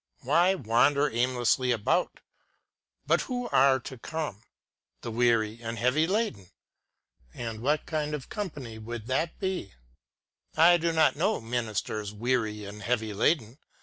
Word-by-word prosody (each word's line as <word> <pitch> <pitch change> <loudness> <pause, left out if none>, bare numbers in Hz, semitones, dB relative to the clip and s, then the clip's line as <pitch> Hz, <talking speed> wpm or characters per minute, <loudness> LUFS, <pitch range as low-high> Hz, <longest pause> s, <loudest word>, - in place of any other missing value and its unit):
Why 175 +8 +3
wander 140 - +2
aimlessly 125 +1 +1
about.? 120 - 0 0.8
But - - +3
who 245 -1 -2
are 135 0 +4
to 130 0 -9
come 150 -8 -4 0.3
} - - -53
The 115 - -4
weary 115 -1 +1
and 115 0 -5
heavy 125 +8 +2
laden! 190 - -1 0.9
And 115 -2 -5
what 150 +5 +1
kind 150 -1 -2
of 140 - -8
company 145 - -6
would 110 0 -7
that 135 +6 -1
be 190 - -3 0.4
} - - -39
I 170 +2 +7
do 170 0 0
not 160 -2 +3
know 200 +7 +1
Messrs. 110 -3 -3
Weary 110 -2 -1
and 105 +1 -9
Heavy 110 0 -1
Laden. 115 +3 +1
125 Hz, 145 wpm, -28 LUFS, 110-155 Hz, 0.9 s, I